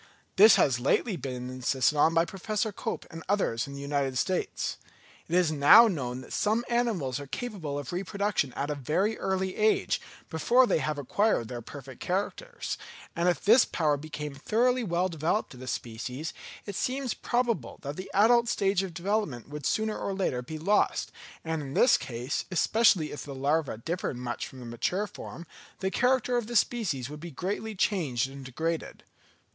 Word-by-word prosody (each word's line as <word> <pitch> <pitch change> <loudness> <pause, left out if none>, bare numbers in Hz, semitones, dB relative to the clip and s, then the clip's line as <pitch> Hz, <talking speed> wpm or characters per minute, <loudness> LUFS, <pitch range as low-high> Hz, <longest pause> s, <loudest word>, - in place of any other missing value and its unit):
This 215 +3 +9
has 125 -4 +3
lately 185 - +1
been 125 -5 -5
insisted 130 +1 +1
on 160 +3 +4
by 165 +1 +4
Professor 210 +5 -2
Cope - - -4
and 165 - -8
others 165 - +1
in 140 - -8
the 140 - -7
United 140 -2 -1
States. 185 +7 -1 0.5
It 170 - -1
is 180 -3 +3
now 155 +11 +8
known 130 - -3
that - - -10
some 220 +3 +1
animals 215 - 0
are 140 - -8
capable 175 - -4
of 145 +2 -5
reproduction 195 -5 -1
at 145 +2 -2
a - - +1
very 160 - 0
early 190 0 -1
age, 215 0 +2 0.3
before 235 - +4
they 235 - +2
have 155 -1 -2
acquired 145 - +1
their 120 -1 -5
perfect 135 +1 -10
characters; 200 - -3 0.4
and 170 +1 +2
if 175 - -1
this 230 +4 +7
power 150 -3 +1
became 150 0 -6
thoroughly 245 - +1
well 180 -2 +1
developed 165 +3 -1
in 125 - -12
a 130 - -8
species, 125 +6 -4 0.3
it 200 - -5
seems 255 +2 -1
probable 235 - -1
that 140 +1 -4
the 185 - -7
adult 235 +4 +5
stage 195 -3 +2
of 185 -4 -6
development 175 - -2
would 150 -1 -4
sooner 220 0 0
or 195 - -3
later 180 -10 -1
be 155 +6 -7
lost; 200 +7 +1 0.3
and 160 -1 -2
in 135 -2 -6
this 250 - +6
case, 125 +3 -3
especially 190 -2 +3
if 145 - -6
the 140 -2 -7
larva 140 -1 0
differed 160 +1 -3
much 120 -1 -4
from 130 - -12
the - - -8
mature 150 - -1
form, 175 -3 -9 0.3
the 190 0 -1
character 250 +1 +2
of 235 -3 -2
the 240 - -5
species 195 - +1
would 150 +2 -8
be 170 +2 -7
greatly 200 +8 -4
changed 150 - +1
and 135 -1 -9
degraded. 160 +6 -3
165 Hz, 180 wpm, -28 LUFS, 140-210 Hz, 0.5 s, This